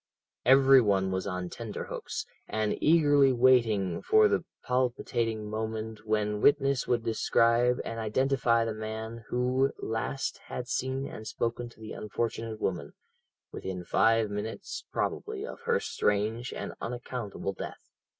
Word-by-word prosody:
"Every 135 0 +7
one 95 -3 +2
was 95 +1 -2
on 90 -1 -3
tenter - - -5
hooks, - - -5 0.2
and 110 -1 0
eagerly 145 -4 +5
waiting 115 -7 +3
for 435 0 +5
the - - +1 0.2
palpitating 120 -3 0
moment 110 0 -4
when 105 -1 0
witness 140 -2 +3
would 120 -2 +1
describe 115 +2 +3
and 115 0 -4
identify 115 +1 +2
the 115 - -2
man 110 +1 -6
who 125 +2 +1
last 115 +4 -3
had 125 - -5
seen 130 +2 -1
and 110 -4 -8
spoken 120 +2 -2
to 115 - -20
the 110 -1 -8
unfortunate 115 +1 -3
woman, 85 -9 -2 0.6
within 95 -2 -5
five 115 +3 +3
minutes 110 - -5
probably 430 -1 -2
of - - -8
her 470 0 +2
strange 110 - -1
and - - -5
unaccountable 120 -4 -4
death. - - -8
115 Hz, 135 wpm, -29 LUFS, 110-130 Hz, 0.6 s, Every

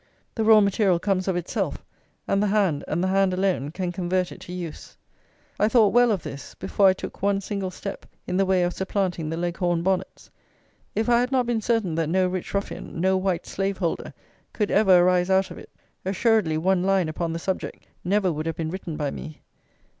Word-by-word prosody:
The 225 - -1
raw 220 -1 +7
material 200 -2 +2
comes 185 +1 -1
of 190 - +1
itself, 175 -1 -3 0.4
and 195 - +2
the 210 - +2
hand, 195 -8 +1
and 170 +4 -1
the - - +1
hand 190 -1 +2
alone, 185 -7 0
can 180 +2 -3
convert 180 0 -1
it - - -11
to - - -9
use. 175 -3 -7 0.6
I 210 - +4
thought 220 -4 +4
well 245 0 +5
of 190 -7 -1
this 140 - -8
before 200 - +2
I 190 - +6
took - - -8
one 200 0 +2
single 200 -1 -3
step 195 +2 -7 0.2
in 180 - -3
the 195 - +3
way 185 -1 +3
of 175 0 0
supplanting 190 -4 -2
the 165 - -3
Leghorn 175 0 -1
bonnets. 190 0 -2 0.6
If 220 +1 0
I 240 -1 +4
had 250 +2 0
not 255 -2 +2
been 235 -2 0
certain 220 -6 0
that 160 -1 -1
no 185 +2 +2
rich 180 -1 -4
ruffian, 200 -3 -4
no 190 +2 +3
white 185 -2 -1
slave 195 0 -2
holder, 170 -4 -2 0.4
could 210 -2 -1
ever 195 -3 +5
arise 180 +1 +3
out 190 0 +2
of - - -8
it, - - -13 0.3
assuredly 195 -3 +2
one 185 +3 +2
line 190 -2 +2
upon 165 +1 -3
the 165 - -3
subject 185 +3 -4 0.2
never 190 -1 +1
would 155 +1 -4
have 165 - -2
been 160 -1 -3
written 170 -4 -5
by 145 -3 -1
me. 155 -1 -9
185 Hz, 210 wpm, -24 LUFS, 175-200 Hz, 0.6 s, raw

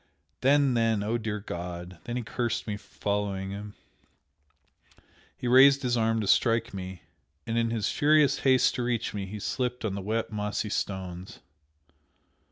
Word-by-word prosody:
then 140 0 +4
then, 115 -3 +1
oh, 110 +3 -1
dear 105 -1 -3
God! 90 -2 -7
then 120 0 -3
he 125 - -3
cursed 120 +1 -2
me 105 - -3
for 100 - -15
following 100 -2 -2
him, 105 +1 -7 1.6
he 125 - -4
raised 135 +3 +7
his 125 -1 +1
arm 115 -1 +1
to 105 - -3
strike 115 0 +2
me, 95 -1 -7 0.4
and 115 - -2
in 115 0 +1
his 115 -3 -1
furious 150 -1 +4
haste 130 -2 +4
to - - -3
reach 120 -1 -1
me 100 -2 -4
he 105 +2 -7
slipped 125 +4 -2
on 105 - -1
the 100 - -4
wet, 110 +3 -2
mossy 105 0 -2
stones. 95 -3 -4
110 Hz, 165 wpm, -28 LUFS, 100-120 Hz, 1.6 s, raised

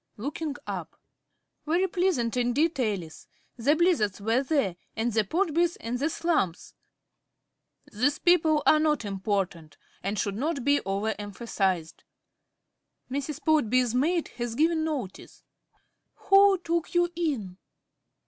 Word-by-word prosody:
(Looking 290 +5 -4
up.) - - -6 0.7
Very 345 +4 +2
pleasant 350 -11 0
indeed, 265 +6 +1
Alice. 195 -9 -3 0.3
The 270 +6 +2
Blizzards 310 - +2
were 225 +5 +1
there, 275 - 0 0.2
and 225 +1 -1
the 220 0 +3
Podbys, 340 - 0
and 240 +2 -3
the 295 +4 +1
Slumphs. 310 - -1 1.2
(These 270 +8 +1
people 320 -4 +3
are 310 - +6
not 305 -6 +1
important 190 -6 -3 0.2
and 200 +3 -3
should 200 0 -1
not 280 +3 -2
be 285 0 +3
over 200 +3 -1
emphasised.) 195 -5 -2 1.1
Mrs. 285 +2 -4
Podby's 255 -6 +2
maid 320 +7 +1
has 240 -1 -3
given 320 +3 +2
notice. 275 -12 -5 0.3
~Alice.~ - - -29
Who 390 0 +7
took 340 -1 -2
you 350 0 +3
in? 260 - -2
265 Hz, 125 wpm, -27 LUFS, 210-320 Hz, 1.2 s, Who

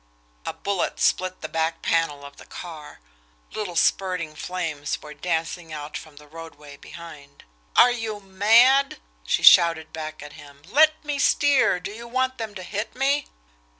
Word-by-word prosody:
A - - -2
bullet 200 -3 -3
split 185 0 0
the - - -4
back 160 0 -2
panel 150 -4 0
of 140 - -12
the - - -13
car 155 - -10 0.5
little 205 -5 -5
spurting 180 -4 0
flames 160 -4 -4
were 150 0 -11
dancing 165 0 -3
out 150 0 -7
from 155 -2 -9
the 150 +1 -15
roadway 150 -2 -12
behind. 145 -3 -13 0.3
"Are 245 - +7
you 225 -3 -4
mad!" 225 +8 +4 0.3
she - - 0
shouted 165 -2 +6
back 155 -1 -7
at 150 - -11
him. 145 -2 -15
"Let 310 - +3
me 290 -1 -2
steer 285 -9 +3
do 180 - -7
you 235 +3 -9
want 260 +1 -1
them 220 -2 -5
to 185 - -7
hit 210 +4 -5
me!" 275 +3 0
175 Hz, 160 wpm, -24 LUFS, 155-220 Hz, 0.5 s, Are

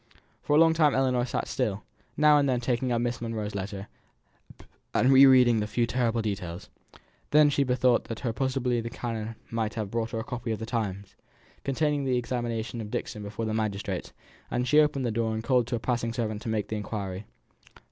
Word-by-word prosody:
For 145 - +1
a - - +6
long 165 0 +6
time 155 -3 +3
Ellinor 130 -2 +2
sat 125 - -3
still; 110 -5 -2 0.3
now 150 0 +6
and 140 -1 +2
then 125 -2 +1
taking 125 +1 -1
up 120 - +1
Miss 120 0 -2
Monro's 110 -3 -3
letter, 100 0 -5 1.1
and 130 - +4
re 135 +1 +9
reading 125 -3 +6
the 105 - -1
few 115 +2 +1
terrible 115 -1 0
details. 95 -4 -5 0.6
Then 150 0 +5
she 140 - +2
bethought 125 -1 +2
her 115 - -4
that 115 0 -3
possibly 130 -2 0
the 115 - -5
canon 115 -2 -5 0.2
might 110 -1 -2
have 105 -3 -4
brought 115 0 -2
a 110 - -2
copy 120 -3 -5
of 110 - -1
the 110 - -5
Times, 100 -4 -3 0.5
containing 145 +1 0
the 130 -2 +1
examination 120 -2 -3
of 105 - -7
Dixon 105 - -4
before 105 +2 -5
the 110 - -2
magistrates, 105 -3 -3 0.4
and 125 +1 -1
she 150 - +5
opened 145 -3 +2
the 120 - 0
door 110 0 -1
and 110 - -4
called 125 -1 +2
to 120 - -1
a - - -2
passing 115 -1 -1
servant 110 -3 -3
to 115 - -5
make 105 -2 -1
the 110 - -2
inquiry. 100 -2 -5
115 Hz, 205 wpm, -27 LUFS, 110-130 Hz, 1.1 s, re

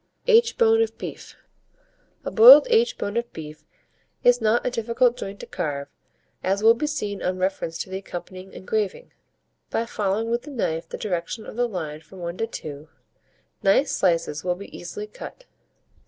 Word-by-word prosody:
AITCHBONE 455 -1 +5
OF 450 - -1
BEEF. - - -8 0.9
A - - -3
boiled - - +10
aitch 475 +2 +3
bone 205 - -4
of 235 0 -2
beef 155 -1 -9 0.6
is 245 0 +5
not 225 +2 +2
a 250 - 0
difficult 235 +1 +1
joint 200 -5 -7
to - - -7
carve, 140 -2 -4 0.5
as 195 +2 0
will 225 +1 +8
be 270 +6 -2
seen 210 -10 -3
on 185 0 -1
reference 185 -3 -2
to - - -4
the 190 0 -4
accompanying 185 0 -8
engraving. 215 - -3 0.6
By 230 - -1
following 215 +1 -1
with 235 +1 0
the 295 - -11
knife 165 - -2
the - - -5
direction 195 +2 -3
of - - -9
the 245 +1 +1
line 155 -6 -5
from 165 +4 -15
1 170 0 -5
to 225 - -1
2, 150 -7 -8 0.7
nice 230 +9 +3
slices 165 -4 0
will 180 -1 0
be 200 +3 -11
easily 190 +4 -6
cut. 215 - -11
205 Hz, 170 wpm, -24 LUFS, 175-245 Hz, 0.9 s, boiled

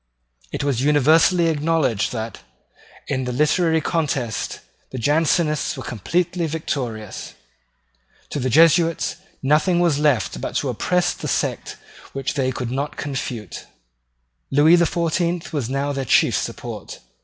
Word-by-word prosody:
It - - -3
was 135 -4 0
universally 155 +5 +4
acknowledged 150 -8 +1
that, 115 -2 -5 0.7
in 130 -2 -1
the 125 - -2
literary 160 +4 +2
contest, 140 -9 -2 0.3
the 130 - -7
Jansenists 155 +3 +1
were 130 - -6
completely 170 - -1
victorious. 125 -9 -4 1.0
To - - -2
the 130 0 -1
Jesuits 165 +4 +4 0.3
nothing 155 +6 +3
was 165 -5 +2
left 140 - +1
but - - -4
to - - 0
oppress 180 -1 +1
the - - -6
sect - - -2 0.4
which 135 -1 -2
they 130 -2 0
could 125 -2 -4
not 140 +3 -3
confute. 125 -7 -5 0.8
Lewis 155 +5 +5
the 170 - +4
Fourteenth 170 0 -1
was 135 -6 -2
now 140 +2 -1
their 135 -1 -3
chief - - +3
support. - - -5
145 Hz, 130 wpm, -21 LUFS, 130-165 Hz, 1.0 s, Lewis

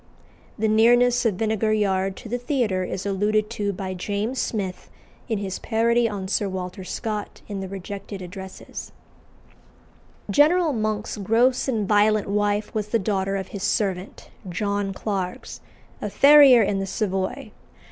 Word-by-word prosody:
The 220 0 +1
nearness 240 +2 +4
of 210 - 0
Vinegar 220 +1 0
Yard 195 -2 +1
to - - -10
the 245 +3 -2
theatre 240 -8 0
is 185 +1 -4
alluded 210 +2 0
to 205 -3 -1
by 190 -1 -5
James 205 +7 -3
Smith 195 -5 -4 0.4
in 220 - 0
his 195 -2 -4
parody 230 +1 +2
on 200 -3 -5
Sir 200 +1 0
Walter 185 0 -5
Scott 210 +3 -5
in 200 -2 -5
the 190 - -4
Rejected 195 +1 -7
Addresses. 190 +1 -8 1.4
General 315 +2 +4
Monk's 215 -1 -2
gross 230 +7 +2
and 220 -6 0
violent 210 0 +3
wife 205 +1 0
was 210 -1 -2
the 230 - +1
daughter 195 -1 -1
of 190 -1 -4
his 200 - -7
servant, 195 -2 -2 0.2
John 200 +2 -1
Clarges, 190 -2 -4 0.4
a - - -2
farrier 280 -4 +7
in 195 0 0
the 195 - -3
Savoy. 190 -2 -2
205 Hz, 145 wpm, -24 LUFS, 195-225 Hz, 1.4 s, farrier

